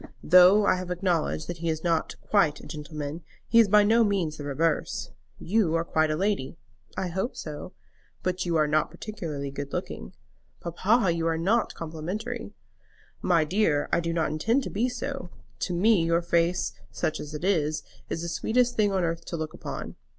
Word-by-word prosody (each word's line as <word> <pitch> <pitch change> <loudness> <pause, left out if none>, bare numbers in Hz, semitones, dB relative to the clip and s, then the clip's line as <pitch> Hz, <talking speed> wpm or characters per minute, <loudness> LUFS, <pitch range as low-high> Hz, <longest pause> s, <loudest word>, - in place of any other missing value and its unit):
Though 185 +4 +7
I 185 - +3
have 180 -1 -5
acknowledged 175 -3 0
that 175 - -4
he 170 0 -1
is 160 0 -2
not 165 -2 0
quite 155 -8 +2
a - - -12
gentleman, 150 0 -6 0.3
he 230 - +5
is 225 - +7
by 210 +1 +6
no 225 +3 +5
means 190 -7 0
the 145 - -6
reverse. 150 +3 -1 0.3
You 190 -4 +1
are 165 - +1
quite 155 -1 +2
a 155 - +1
lady." 180 -5 -1 0.4
"I 185 - -1
hope 190 +8 -2
so." 155 +4 -7 0.5
"But 185 0 -1
you 170 -2 -1
are 155 - +4
not 150 +1 +1
particularly 155 -10 -5
good 140 0 -6
looking." - - -5 0.4
"Papa, 190 +4 +2
you 165 0 -1
are 165 -1 +1
not 205 +8 +1
complimentary." 180 +10 -5 0.7
"My 170 -3 +3
dear, 155 -3 +1
I - - +4
do 170 0 -2
not 165 -2 0
intend 225 - +1
to - - -5
be 235 +5 +1
so. 270 -5 -5 0.3
To 180 - -2
me 200 0 +4
your 170 +1 +2
face, 170 +1 +1 0.2
such 155 - -2
as 150 +1 -7
it 150 - -6
is, 155 -5 +1 0.3
is 165 - -3
the - - -3
sweetest 245 +8 +1
thing 210 -2 +3
on 190 -2 +1
earth 165 0 -1
to 170 - -4
look 155 -1 -4
upon." - - -7
170 Hz, 190 wpm, -27 LUFS, 155-200 Hz, 0.7 s, Though